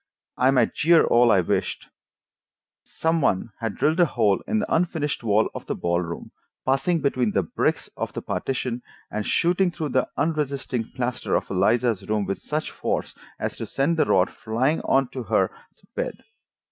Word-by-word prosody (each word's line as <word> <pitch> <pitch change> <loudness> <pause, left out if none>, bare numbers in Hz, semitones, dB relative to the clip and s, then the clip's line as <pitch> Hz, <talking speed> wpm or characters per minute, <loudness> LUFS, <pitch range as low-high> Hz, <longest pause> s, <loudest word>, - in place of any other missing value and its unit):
I 130 - +3
might 130 -2 +3
jeer 165 +1 +5
all 120 0 +5
I 95 - +5
wished: 85 - -2 1.0
some 165 0 0
one 105 -3 +1
had 115 -3 -3
drilled 155 +5 +1
a 175 - +6
hole 110 -7 +2
in 220 - +1
the 210 - -1
unfinished 160 -5 -1
wall 110 0 +3
of - - -8
the - - -1
ball 85 0 0
room, 85 -1 -6 0.3
passing 135 +6 +2
between 130 -6 +1
the - - +2
bricks - - -1
of - - -3
the - - -4
partition, 125 -2 -2 0.3
and 105 0 -3
shooting 180 +2 +2
through 160 -3 -4
the 130 0 +1
unresisting 140 -6 -1
plaster 125 -1 -1
of - - -1
Eliza's 105 +1 +1
room 105 -1 +1
with 100 - -3
such 155 +1 -3
force - - -2 0.3
as - - -3
to - - -5
send 155 +5 0
the - - +4
rod 95 0 +3
flying 125 +8 0
on 135 -1 +3
to 130 - -5
her 115 - +1 0.4
bed. - - -3
130 Hz, 175 wpm, -24 LUFS, 110-155 Hz, 1.0 s, a